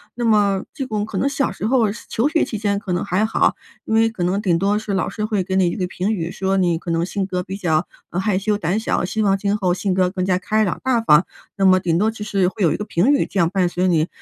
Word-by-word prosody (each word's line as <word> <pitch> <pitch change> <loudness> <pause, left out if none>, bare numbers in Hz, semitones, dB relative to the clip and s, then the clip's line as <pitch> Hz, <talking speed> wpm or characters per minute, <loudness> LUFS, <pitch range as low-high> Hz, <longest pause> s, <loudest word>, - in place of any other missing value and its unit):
那 240 - -2
么 205 -3 +2
这 270 - -4
种 215 -4 -2
可 205 -3 -6
能 275 - +1
小 275 -1 0
时 - - -5
候 230 -2 +3 0.2
求 230 +5 +1
学 325 +1 +2
期 215 - -5
间 205 -1 0
可 200 -2 -5
能 175 - -1
还 200 +2 +1
好， 220 - +1 0.3
因 220 - 0
为 225 0 +4
可 205 -6 -4
能 190 +3 0
顶 175 -5 +1
多 200 +3 +1
是 215 -1 -4
老 190 - 0
师 215 - -5
会 210 -3 -1
给 190 - -2
你 190 -1 +3
一 170 - -2
个 185 -3 -1
评 185 +3 -2
语， 170 -5 -3
说 190 +2 -1
你 175 -3 +2
可 170 +1 -5
能 165 0 +1
性 195 +1 -2
格 180 -1 -2
比 190 +2 -6
较， 160 -3 0 0.2
呃， 175 - -2
害 190 0 0
羞 205 +2 0
胆 185 0 -1
小， 220 - -1
希 220 +4 -2
望 195 -1 +3
今 200 +1 0
后 185 -4 +1
性 190 +1 -1
格 185 -1 +2
更 185 -2 -3
加 185 -1 +2
开 215 +3 0
朗 180 - -2
大 255 -2 +2
方， 170 -5 +5 0.3
那 195 - 0
么 185 0 +6
顶 170 -3 0
多 215 +4 +2
就 220 -1 -7
是 195 -3 +1
会 205 - -9
有 170 -5 +4
一 - - 0
个 - - -4
评 195 +10 +2
语 285 - +2
这 195 - -3
样 170 -2 +3
伴 185 -1 +1
随 180 +1 0
你。 165 -2 +2
195 Hz, 315 characters per minute, -20 LUFS, 180-215 Hz, 0.3 s, 么